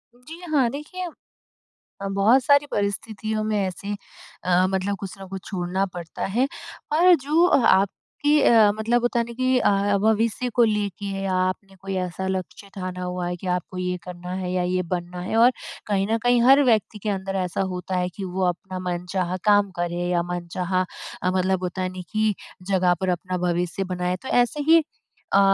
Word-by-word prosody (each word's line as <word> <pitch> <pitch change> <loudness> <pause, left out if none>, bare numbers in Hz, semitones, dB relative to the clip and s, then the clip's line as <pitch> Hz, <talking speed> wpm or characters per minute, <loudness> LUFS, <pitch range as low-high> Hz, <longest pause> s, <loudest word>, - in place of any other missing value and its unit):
जी 315 +8 -12
हाँ, 260 -5 +4
देखिए, 330 +6 -6 1.0
अ, 195 - -2
बहुत 215 +7 +4
सारी 285 0 +5
परिस्थितियों 215 +1 -2
में 215 -1 0
ऐसे 200 +2 -3 0.5
अ, 180 0 +3
मतलब 190 +1 -1
कुछ 195 -2 -6
न 190 - -8
कुछ 190 0 -6
छोड़ना 185 0 -1
पड़ता 170 -2 -5
है 240 +8 +1 0.5
और 355 +3 +6
जो 305 +4 +2
अ, - - +5
आपकी 290 +10 +2
अ, 220 -3 +6
मतलब 230 +3 +1
होता 240 0 +1
है 235 - +1
ना 235 - -8
कि 255 +1 +2
अ, 200 -1 +2
भविष्य 225 +3 +1
को 240 - +5
लेके 200 -2 -1
आपने 185 +1 -1
कोई 195 0 -4
ऐसा 190 +2 -5
लक्ष्य 190 +1 -4
ठाना 185 -1 -5
हुआ 180 -1 -3
है 175 - -2
कि 185 - -7
आपको 180 +1 -2
ये 180 0 -1
करना 180 0 -8
है 180 - -3
या 180 - +1
ये 185 +1 0
बनना 175 0 -6
है 185 - -3
और 240 +2 +7 0.4
कहीं 195 -1 +1
न 225 - +3
कहीं 245 -1 +4
हर 270 +3 +7
व्यक्ति 220 -3 +1
के 215 - -1
अंदर 195 0 -2
ऐसा 180 - -2
होता 180 +1 -4
है 180 0 0
कि 195 - -5
वो 185 0 -1
अपना 185 +1 -4
मनचाहा 180 +1 -2
काम 205 -2 +4
करे 175 0 -1
या 175 -1 +2
मनचाहा 180 +1 -1 0.4
अ, 180 - +1
मतलब 185 0 +1
होता 180 +1 -3
है 185 - -1
ना 185 0 -7
कि 215 -1 +2 0.4
जगह 180 -2 +4
पर 190 - 0
अपना 180 +1 -2
भविष्य 175 +2 -1
बनाए। 180 -1 -2
तो 260 - -9 0.2
ऐसे 290 +5 -4
ही 330 -1 +7 0.5
अ, 195 - +6
195 Hz, 190 wpm, -24 LUFS, 180-220 Hz, 1.0 s, और